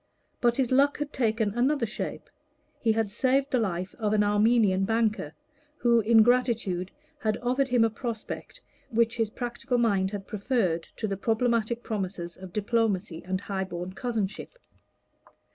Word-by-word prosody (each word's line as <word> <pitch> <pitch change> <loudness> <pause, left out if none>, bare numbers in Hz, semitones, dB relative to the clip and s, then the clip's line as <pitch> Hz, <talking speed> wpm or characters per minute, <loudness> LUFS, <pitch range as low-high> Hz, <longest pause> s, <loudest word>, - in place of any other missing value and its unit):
But 240 -1 +2
his 260 -2 +1
luck 280 +2 +4
had 295 0 -4
taken 220 -4 +1
another 255 +2 +2
shape: 215 - -5 0.5
he 225 -2 +2
had 220 -2 0
saved 265 +5 +1
the 255 - +3
life 185 -3 -2
of 210 -2 0
an 210 -1 +4
Armenian 205 -2 +3
banker, 215 -7 0 0.4
who 235 -3 +4
in 225 0 +6
gratitude 230 -7 +1 0.3
had 215 -5 0
offered 255 +3 +1
him 245 -3 +3
a 225 - +4
prospect 230 -1 -6 0.3
which 230 0 +1
his 225 -2 +1
practical 245 +2 -3
mind 200 -5 +2
had 200 -1 -6
preferred 200 -6 -1
to 220 - -3
the 195 -1 -2
problematic 230 +2 0
promises 185 -5 -4
of 185 -1 -10
diplomacy 205 -4 0
and 185 +1 -2
high 195 -2 -2
born 180 0 -6
cousinship. 220 - -3
220 Hz, 155 wpm, -27 LUFS, 195-240 Hz, 0.5 s, in